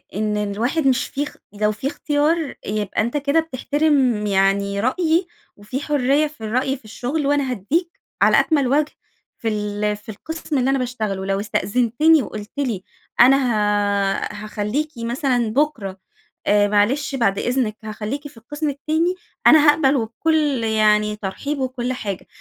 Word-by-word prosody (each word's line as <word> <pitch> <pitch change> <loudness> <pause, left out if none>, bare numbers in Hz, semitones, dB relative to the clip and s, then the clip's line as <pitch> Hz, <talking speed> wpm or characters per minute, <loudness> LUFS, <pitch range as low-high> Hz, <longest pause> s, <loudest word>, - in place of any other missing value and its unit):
إن 210 0 0
الواحد 230 +9 0
مش 260 -1 +2
في 285 - -2
اخ 295 - -9 0.2
لو 210 +1 +1
في 220 +6 -4
اختيار 300 +1 0
يبقى 210 0 -1
أنتَ 240 +6 -1
كده 290 +3 +2
بتحترم 285 -6 +1
يعني 200 0 +1
رأيي، 330 - +1 0.3
وفي 210 +6 -5
حريّة 290 +1 +2
في 295 -6 -16
الرأي 255 +5 0
في 235 - -23
الشغل 275 +7 -3
وأنا 285 -3 +1
هاديك 320 - -2 0.2
على - - +6
أكمل 285 -5 +2
وجه 295 +3 +2 0.5
في 230 - -5
ال 210 -1 -1
في 210 - -16
القسم 315 +6 -4
اللي 260 +1 +2
أنا 270 -1 +2
باشتغله 220 -6 -3
ولو 195 0 -1
استأذنتني 245 +9 +2
وقُلت 210 0 -8
لي 235 -9 -2 0.4
أنا 260 +3 +7
هـَ 205 -5 +1 0.2
هاخليكِ 215 +9 -2
مثلًا 240 0 0
بُكرة، 240 -10 -1 0.5
آآ 205 0 +4
معلش 255 +8 +1
بعد 200 -6 +1
إذنك 245 -4 -1
هاخليكِ 220 +7 -5
في 270 - -17
القسم 295 +6 -4
التاني، 315 +5 0 0.3
أنا 310 -1 +7
هاقبل 290 -2 +4
وبكل 275 +2 0
يعني 210 -1 +2
ترحيب 245 +9 -4
وكل 255 -1 -2
حاجة، 200 -6 -5
250 Hz, 150 wpm, -21 LUFS, 210-290 Hz, 0.5 s, أنا